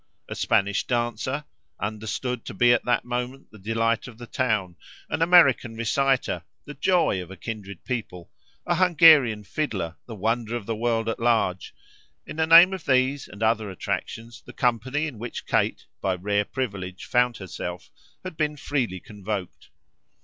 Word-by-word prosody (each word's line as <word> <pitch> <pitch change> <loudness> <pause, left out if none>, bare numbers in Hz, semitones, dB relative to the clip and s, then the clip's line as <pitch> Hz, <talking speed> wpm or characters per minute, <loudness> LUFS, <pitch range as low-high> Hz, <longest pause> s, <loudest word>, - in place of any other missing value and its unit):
A - - -5
Spanish 100 +1 +1
dancer, 120 +4 -1 0.3
understood 110 +3 -3
to - - -7
be 120 +4 +5
at 120 - 0
that 120 - +1
moment 125 +2 -4
the 110 - -14
delight 115 +2 0
of 120 -3 -12
the 120 - -9
town, 110 -9 -1 0.4
an - - -1
American 155 -9 +5
reciter, 130 +3 0 0.2
the 145 - -8
joy 165 - +2
of 90 - -10
a 95 - -10
kindred 100 -5 -7
people, 110 -9 -5 0.3
an - - +1
Hungarian 155 - +6
fiddler, 95 - -3
the 115 - -7
wonder 115 +3 -1
of 115 -4 -5
the 115 - -2
world 115 0 0
at 115 - -2
large 110 -7 0 0.5
in - - -9
the 160 0 +1
name 170 +3 +9
of 190 -4 -6
these 130 +1 +2
and 105 +2 -7
other 110 -1 +1
attractions 115 +5 -5
the - - -12
company 130 +4 0
in 135 -8 -6
which 120 +1 -6
Kate, - - 0 0.2
by 95 -1 0
a - - -9
rare 100 +2 0
privilege, 100 -8 -5
found 125 -1 +2
herself 90 -2 -7 0.3
had 185 - -6
been 150 -1 -1
freely 125 -10 -2
convoked. 100 -1 -6
115 Hz, 165 wpm, -25 LUFS, 105-130 Hz, 0.5 s, name